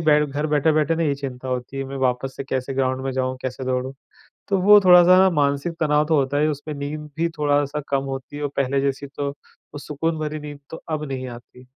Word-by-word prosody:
बैठ 150 -2 +3
घर 145 +3 -2
बैठे-बैठे 150 +1 +2
ना 165 - 0
ये 145 -3 +1
चिंता 130 -2 -6
होती 125 +1 -4
है 135 - -2
मैं 135 +1 -6
वापस 125 +1 -2
से 135 - -5
कैसे 130 0 -3
ग्राउंड 130 0 0
में 135 - -2
जाऊँ, 130 0 -1
कैसे 130 0 -4
दौड़ूँ? 130 +1 -2 0.5
तो 195 - +1
वो 205 +2 +8
थोड़ा-सा 180 0 +8
ना 190 0 +6
मानसिक 145 +2 0
तनाव 150 -1 +2
तो 160 0 +2
होता 140 0 +1
ही 150 - +2
है, 155 - +2
उसपे 150 +1 -6
नींद 150 +1 -5
भी 170 - +1
थोड़ा-सा 145 0 +1
कम 135 -1 +1
होती 135 +2 -7
है 145 - -5
और 145 - -1
पहले 135 0 +1
जैसी 140 0 -2
तो 140 0 -4
वो 145 +1 -16
सुकून 160 +3 -2
भरी 155 0 -3
नींद 145 -1 -8
तो 160 - -6
अब 155 -1 -2
नहीं 130 -1 -4
आती। 120 +1 -13
145 Hz, 235 wpm, -22 LUFS, 135-150 Hz, 0.5 s, वो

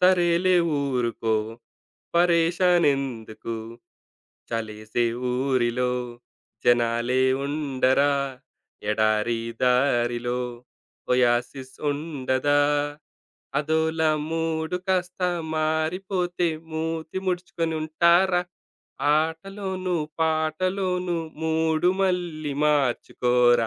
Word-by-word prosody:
సరేలే 180 0 +4 0.2
ఊరుకో, 120 -5 0 0.8
పరేషాన్ 175 0 +4
ఎందుకు? 115 -4 -5 1.0
చలేసే 110 0 -2 0.3
ఊరిలో, 125 -1 +1 0.7
జనాలే 120 +1 +2 0.2
ఉండరా? 140 -1 +2 0.8
ఎడారి 110 +2 +1 0.2
దారిలో, 120 -1 +2 0.7
ఒయాసిస్ 125 +2 +1
ఉండదా? 145 -1 0 1.0
అదోలా 160 +1 +1 0.2
మూడు 165 +1 -1
కాస్త 180 -1 0 0.3
మారిపోతే 175 +3 0 0.2
మూతి 160 +2 -3
ముడుచుకొనుంటారా? 175 0 +2 0.7
ఆటలోనూ, 185 +4 -2 0.3
పాటలోనూ 180 +3 0 0.3
మూడు 160 +1 +2
మళ్ళి 175 -6 -1
మార్చుకోరా! 125 -4 +2
155 Hz, 60 wpm, -25 LUFS, 125-175 Hz, 1.0 s, సరేలే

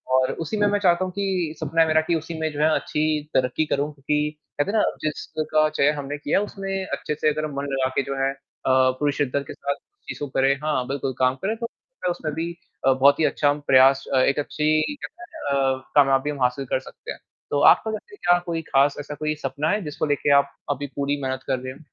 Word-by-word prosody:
और 130 0 +3
उसी 215 - -3
में 205 0 +3
मैं 205 0 +1
चाहता 180 -1 +3
हूँ 185 - -5
कि 185 -5 -1
सपना 160 +1 +1
है 160 - +4
मेरा 155 0 +4
कि 170 - +2
उसी 160 +1 -4
में 160 -1 -1
जो 145 - -6
है 155 - +5
अच्छी 150 -1 0
तरक्की 130 +4 +1
करूँ, 145 +1 -1
क्योंकि 150 +2 -1 0.2
कहते 170 +8 +1
हैं 220 - +1
ना - - +4 0.2
जिसका 155 0 0
चयन 150 -1 +2
हमने 145 0 -4
किया 145 +5 +1
है, 205 - -1
उसमें 195 -1 -4
अच्छे 150 - -3
से 155 - +2
अगर 155 +1 -1
मन 140 +1 -3
लगा 130 -1 +1
के - - +3
जो 140 +1 -4
है 135 - +2
अ, - - -19 0.6
पूरे 145 -1 +2
शिद्दत 140 0 0
के - - -6
साथ 140 0 -3
चीज़ों 405 - -9
को - - -17
करें 135 +1 +4
हाँ, 140 -5 0
बिल्कुल 135 -1 -2
काम 130 0 +3
करें, 215 +3 0
तो 235 - -5
उसमें 160 -3 -4
भी 165 +3 -3 0.4
अ, 135 - +6
बहुत 140 +3 +4
ही 160 - +4
अच्छा 145 -1 +2
प्रयास 135 +1 +6 0.2
एक 140 - +1
अच्छी 155 +1 +1
कहते 315 +4 -10
है 345 - -9 0.3
ना 140 - +2 0.2
अ, 130 0 -15
कामयाबी 135 0 +4
हम 140 -3 -5
हासिल 125 +2 0
कर 130 - 0
सकते - - -10
हैं, - - -8 0.3
तो 145 - +1
आपका 220 - +1
वैसे 410 - -7
क्या 175 - +3
कोई 165 -1 -2
ख़ास 140 +1 +4
ऐसा 145 0 -6
कोई 155 +1 -2
सपना 140 +4 -1
है 210 +3 +1
जिसको 150 0 -3
लेके 145 -1 +1
आप 140 0 +4 0.2
अभी 145 +1 -3
पूरी 140 0 -1
मेहनत 130 0 -3
कर 130 -2 0
रहे 130 0 -6
हो? 140 - -16
150 Hz, 240 wpm, -24 LUFS, 140-165 Hz, 0.6 s, अ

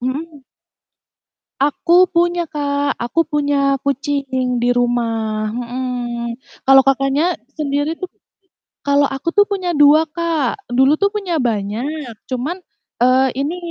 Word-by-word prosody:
hmm. 285 +3 -5 1.2
Aku 345 +6 +3
punya, 345 -1 +1
Kak. 285 -1 -1
Aku 305 +8 0
punya 285 -2 +1
kucing 275 -3 -1
di 245 - +2
rumah, 225 -3 -1
mhm. 240 -1 -4 0.3
Kalau 270 0 +7
Kakaknya 275 +6 +2 0.2
sendiri 290 +1 -1
tuh 370 - -5 0.8
kalau 285 0 +3
aku 270 +5 -5
tuh 410 - +5
punya 375 -3 -2
2, 295 +2 +6
Kak. 330 0 -2
Dulu 265 +4 +4
tuh 400 0 +3
punya 390 -5 -2
banyak, 235 +5 -3
cuman, 265 +7 -3 0.5
eee, 255 +1 +4
ini 290 +6 -2
280 Hz, 120 wpm, -18 LUFS, 250-315 Hz, 1.2 s, Kalau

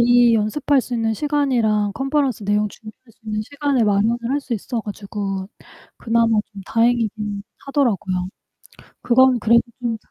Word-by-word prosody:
이 240 0 +5
연습할 255 +5 +1
수 250 - -9
있는 225 -1 0
시간이랑 240 -8 +1
컨퍼런스 270 -5 -1
내용 210 +1 +1
준비할 215 +1 -12 0.2
수 - - -34
있는 215 -1 -2
시간을 280 0 0
마련을 210 +3 +2
할 285 +1 +1
수 250 - -6
있어 230 +2 -3
가지고 200 -2 -5 0.5
그나마 230 -1 +2
좀 200 - -9
다행이긴 220 -3 0 0.2
하더라고요. 200 -10 0 0.7
그건 255 +1 +4
그래도 230 +2 +4 0.2
좀 230 -2 -1
잘 - - -35
230 Hz, 335 characters per minute, -21 LUFS, 210-250 Hz, 0.7 s, 이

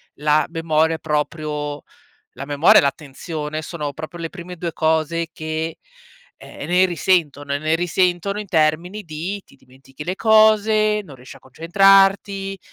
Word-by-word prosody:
la 150 +1 +2
memoria 160 -1 +1
è - - -9
proprio 150 -1 -3 0.6
la 135 - -6
memoria 145 +2 +5
e - - -4
l'attenzione, 150 +2 -4
sono 150 -3 -5
proprio 155 +4 -9
le 165 - -4
prime 180 +1 -10
2 170 0 -4
cose 160 +1 0
che, 160 0 -4 0.6
ehm, - - -10
ne 180 +1 +3
risentono 155 -5 0
e - - -1
ne 155 +2 0
risentono 180 +3 0
in 210 - -7
termini 170 +5 0
di: 170 +6 -5
ti - - -21
dimentichi 135 +2 -14
le 185 +2 -3
cose, 215 -1 +4
non 145 - -12
riesci 125 0 -13
a - - -15
concentrarti, 195 +5 +2
165 Hz, 150 wpm, -20 LUFS, 150-185 Hz, 0.6 s, memoria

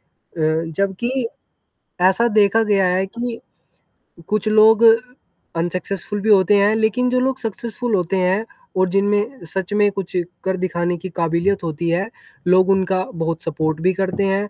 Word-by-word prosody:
अ, 160 0 -2
जबकि 235 +6 -1 0.7
ऐसा 190 +6 +4
देखा 210 +2 +4
गया 200 -3 +2
है 185 +1 +1
कि 235 +3 -5 0.9
कुछ 215 0 -1
लोग 215 +1 +5 0.7
अनसक्सेसफुल 185 +4 -3
भी 220 - -1
होते 200 -1 +5
हैं 205 +2 +3
लेकिन 225 +3 +1
जो 255 - +1
लोग 260 +1 -1
सक्सेसफुल 225 0 -3
होते 180 +1 -1
हैं 190 +4 +1 0.3
और 185 0 +2
जिनमें 205 +4 0
सच 190 +1 -3
में 205 0 +3
कुछ 190 -2 -6 0.3
कर 190 0 -1
दिखाने 175 -1 -1
की 185 +3 -7
काबिलियत 170 +4 0
होती 165 +1 -3
है 185 +6 0 0.4
लोग 185 +1 +4
उनका 190 -1 +1
बहुत 165 0 -2
सपोर्ट 160 0 -2
भी 185 +2 +2
करते 190 +1 -1
हैं 195 +2 0
195 Hz, 155 wpm, -20 LUFS, 180-215 Hz, 0.9 s, लोग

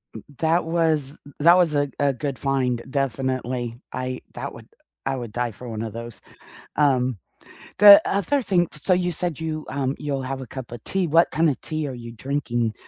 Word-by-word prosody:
M 110 - -8 0.2
that 165 +1 +2
was 160 -4 0 0.2
that 170 +4 +7
was 170 -4 +3
a 145 -1 +1
a 140 -1 +2
good 140 0 -4
find, 130 -4 0
definitely. 130 -3 -2 0.2
I 130 0 -4
that - - -6
wa - - -10
u - - -21 0.4
I 135 0 0
would 120 -4 -6
die 120 0 -2
for 120 +3 -10
one 110 -1 -4
of 110 -2 -5
those. 115 -1 -8 0.6
Um, 130 -6 +2 0.6
the 205 -1 +10
other 265 +8 +1
thing 175 -6 +2
s 150 - -5
so 185 - +3
you 180 0 +1
said 175 -2 -1
you 155 -1 -4
um, 135 0 -1
you'll 140 -3 -3
have 135 0 -4
a 130 - -8
cup 130 -2 -8
of 120 -2 -8
tea. 190 -3 0
What 165 +3 +4
kinda 155 -4 +2
tea 155 -2 -3
are 130 - -5
you 120 -1 -8
drinking 120 -2 -2
135 Hz, 200 wpm, -23 LUFS, 125-160 Hz, 0.6 s, the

